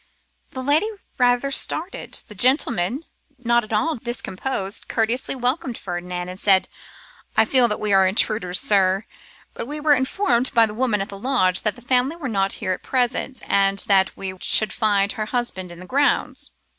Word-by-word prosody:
The 260 - -7
lady 300 +10 +2 0.3
rather 245 +2 +2
started; 325 +6 -2
the - - -10
gentleman, 245 - +1 0.3
not 235 -1 +1
at 215 - -12
all 310 +8 0
discomposed, 230 -3 -3
courteously 230 +4 -1
welcomed 250 -1 -2
Ferdinand, 180 0 -5
and 185 +1 -8
said, 195 -2 +3 0.7
'I - - +5
feel 250 +1 +5
that 210 - -3
we 210 -1 0
are 190 -1 +5
intruders, 185 -2 +1
sir. 195 0 +1 0.5
But - - -6
we 300 +2 -5
were 300 0 +4
informed 260 -2 0
by 230 -1 +6
the 210 - -6
woman 225 -3 0
at 195 - -4
the 200 - -8
lodge 200 -7 +1
that 215 - -1
the 245 - -14
family 255 +4 +1
were 325 -5 -6
not 195 -3 0
here 185 - -3
at - - -7
present, 255 +1 -1
and 195 0 +2
that 190 -1 +2
we 190 -1 -3
should 215 - +2
find 205 -3 +1
her 215 -3 -4
husband 215 -7 -3
in 175 - -11
the 185 - -9
grounds. 280 +8 0
225 Hz, 180 wpm, -22 LUFS, 195-260 Hz, 0.7 s, by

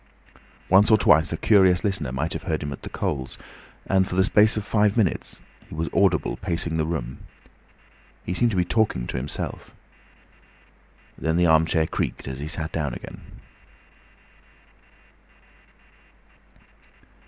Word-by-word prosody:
Once 95 +3 +5
or 110 - +6
twice 80 -5 +4
a 80 - -2
curious 95 -3 +4
listener 95 - -1
might 75 +6 -2
have - - -4
heard 80 -1 -1
him 75 - -4
at - - -11
the - - -8
coals, 65 -1 -4 0.5
and 95 -1 +2
for 90 - -5
the 95 - +4
space 105 +2 +3
of 105 - -3
five 105 0 +1
minutes 105 -7 -1 0.3
he - - -9
was 80 +1 -3
audible 100 -1 +1
pacing 85 -3 -3
the 80 -1 0
room. 70 -7 -4 1.1
He 90 - -3
seemed 120 +6 +2
to 100 - -2
be 90 - +2
talking 105 - 0
to - - -5
himself. 70 +3 -6 1.4
Then 80 +4 0
the 90 - +3
armchair 80 0 +3
creaked - - -4
as 65 0 -6
he 75 - -5
sat 80 0 -4
down 75 -6 -3
again. - - -10
85 Hz, 145 wpm, -24 LUFS, 80-100 Hz, 1.4 s, or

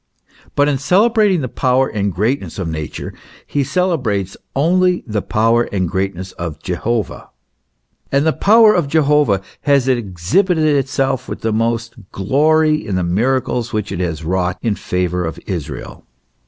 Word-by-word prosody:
But 145 0 +3
in 140 -2 0
celebrating 200 - +3
the 130 - -2
power 130 +1 +1
and 100 -2 -2
greatness 110 - -2
of 95 -4 -3
Nature, 80 -2 -5 0.3
he 145 - -1
celebrates 130 - -1 0.2
only 180 +5 +2
the 105 -3 -2
power 115 +2 +1
and 95 -3 0
greatness 95 +1 -3
of 85 -4 -6
Je 90 - -4
hovah. 115 +5 -3 0.8
And 140 +2 +2
the 160 - +3
power 220 +1 +5
of 175 -5 +1
Jehovah 145 - +2 0.2
has 140 -3 +2
exhibited 130 - +1
itself 135 -1 -1
with - - -6
the 110 -1 -1
most 115 +1 -1 0.2
glory, 155 +8 +2
in 100 - -3
the 90 - 0
miracles 120 +5 0
which 105 -1 -2
it - - -4
has 85 -3 -3
wrought 90 +1 0
in 115 -3 +1
favour 90 -2 -2
of 80 -1 -4
Israel. 80 -7 -6
120 Hz, 155 wpm, -17 LUFS, 95-145 Hz, 0.8 s, power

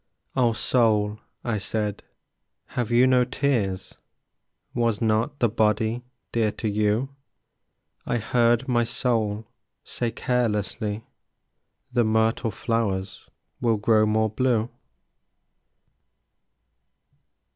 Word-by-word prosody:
"O 120 -3 +3
Soul," 110 -3 +2 0.2
I 115 -3 -1
said, 105 +1 -2 0.7
"have 120 -3 -1
you 120 +2 +5
no 130 -1 +4
tears? 115 -8 -1 0.8
Was 115 -3 +1
not 115 +5 +1
the 120 - +3
body 110 +2 +1 0.3
dear 110 -2 +1
to 110 - -3
you?" 105 +5 +1 0.9
I 120 - -1
heard 120 +2 +2
my 120 -2 +2
soul 115 -3 -1 0.4
say 120 - -2
carelessly, 110 -3 -1 0.9
"The 120 -2 +3
myrtle 110 +1 +2
flowers 100 -4 -2 0.3
will 115 -3 +2
grow 110 +1 +3
more 110 0 +2
blue." 120 -1 +1
115 Hz, 95 wpm, -25 LUFS, 105-120 Hz, 0.9 s, you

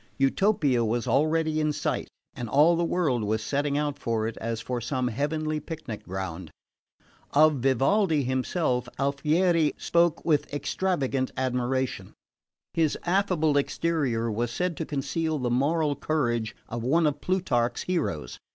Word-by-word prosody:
Utopia 140 - +2
was 115 +2 -1
already 155 +5 +2
in 155 0 +1
sight; - - -2 0.3
and 120 -2 -6
all 150 +7 +5
the 170 - 0
world 155 -9 +1
was 110 +1 -1
setting 145 +3 0
out 145 -1 -1
for 115 -2 -1
it 115 - -5
as 115 0 -3
for 120 +1 -3
some 125 +1 -1
heavenly 155 +5 -1
picnic 150 -8 -7
ground. 95 -2 -5 0.8
Of 155 0 +5
Vivaldi 140 - +2
himself, 130 -1 -1
Alfieri 150 +4 +2
spoke 170 -1 +1
with 150 -3 +1
extravagant 145 -4 -1
admiration. 130 0 -1 0.6
His 160 -3 +1
affable 175 -5 +2
exterior 140 -7 0
was 115 +3 -1
said 180 +7 -2
to 160 - -4
conceal 155 +3 -1
the 125 -3 -1
moral 145 +4 +1
courage 120 -9 -1
of 115 0 -4
one 155 +8 +2
of 145 -1 0
Plutarch's 150 -11 0
heroes. 85 - -2
140 Hz, 140 wpm, -27 LUFS, 120-160 Hz, 0.8 s, all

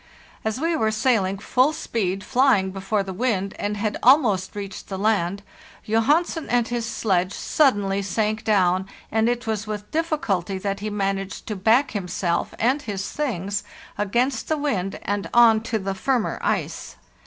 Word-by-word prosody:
As 220 +3 -2
we 330 +2 +1
were 220 -8 +1
sailing 215 -4 +1
full 255 +8 +2
speed, 195 -9 -2
flying 240 -6 +3
before 195 +2 -1
the 190 -1 -6
wind, 200 -3 -1
and 205 0 -2
had 210 0 -1
almost 225 -10 +4
reached 200 -1 -6
the 190 - -4
land, 200 -2 0 0.4
Johansen 295 +9 +1
and 240 -1 +2
his 240 -1 -2
sledge 185 -5 0
suddenly 205 -9 +2
sank 215 +3 -1
down, 190 -3 +2 0.2
and 220 +1 +2
it 245 0 -2
was 220 -1 -2
with 210 -1 -5
difficulty 220 - -1
that 195 +1 -3
he 210 +1 -3
managed 195 -1 -2
to 215 - -2
back 225 +8 +3
himself 180 -3 -2
and_ 260 +6 +2
his 200 -7 -4
things 205 - -2 0.3
against 235 +5 0
the 315 - 0
wind 200 -11 -1
and 205 0 -2
on 230 -2 +6
to 230 0 -2
the 195 -1 -3
firmer 245 +4 -1
ice. - - -2
210 Hz, 160 wpm, -23 LUFS, 195-240 Hz, 0.4 s, on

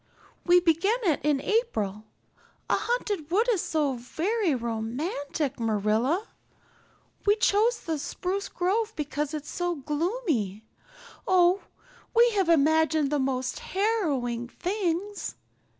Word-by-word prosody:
We 355 0 +6
began 355 +6 +2
it 330 -7 +2
in 295 -2 +2
April. 220 - -1 0.7
A - - +5
haunted 415 -10 -2
wood 425 +7 +2
is 400 -7 +1
so 300 -4 0
very 330 - -1
romantic, 260 - -3
Marilla. 225 - +1 1.0
We 410 - +6
chose 440 +2 +2
the 320 -3 -3
spruce 380 +7 -3
grove 425 +5 0
because 295 0 -3
it's 300 -1 -6
so 350 -1 -1
gloomy. 295 - -2 0.6
Oh, 365 +1 +4 0.5
we 475 +1 +6
have 390 -5 +1
imagined 315 -1 +3
the 295 - +1
most 260 -1 -1
harrowing 295 - -1
things. 375 - -2
320 Hz, 115 wpm, -27 LUFS, 270-400 Hz, 1.0 s, We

